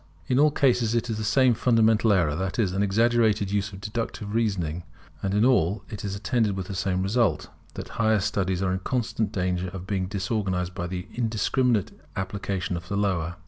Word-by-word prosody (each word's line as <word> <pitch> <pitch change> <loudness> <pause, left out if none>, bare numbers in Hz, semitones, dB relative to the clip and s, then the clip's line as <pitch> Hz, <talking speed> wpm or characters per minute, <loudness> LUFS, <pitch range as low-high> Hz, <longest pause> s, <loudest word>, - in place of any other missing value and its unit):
In 125 +7 +1
all 150 +1 +6
cases 120 -5 +2
it 120 0 0
is 110 - -3
the - - -2
same 125 +3 +4
fundamental 115 -1 +3
error: 85 -7 +2
that 95 +2 -3
is, 100 -6 +1
an 95 - 0
exaggerated 110 0 +2
use 100 0 -1
of 95 - -9
deductive 105 0 -4
reasoning; 95 -8 0 0.4
and 95 0 -1
in 105 +3 +4
all 105 -6 +2
it 105 - -6
is 100 -1 -3
attended 105 0 0
with 95 - -3
the 100 - -6
same 95 0 -1
result; 115 +5 +1 0.3
that - - -5
the - - -13
higher 110 -2 +2
studies 95 -1 -1
are 95 -1 +1
in 95 - -1
constant 110 0 -1
danger 90 -1 -1
of 90 0 -7
being 95 -2 -1
disorganized 95 -2 -2
by 90 -2 -4
the 90 0 -5
indiscriminate 115 -1 +1 0.3
application 95 -1 -3
of 85 0 -6
the 100 - -2
lower. 90 -4 0
100 Hz, 200 wpm, -26 LUFS, 95-115 Hz, 0.4 s, all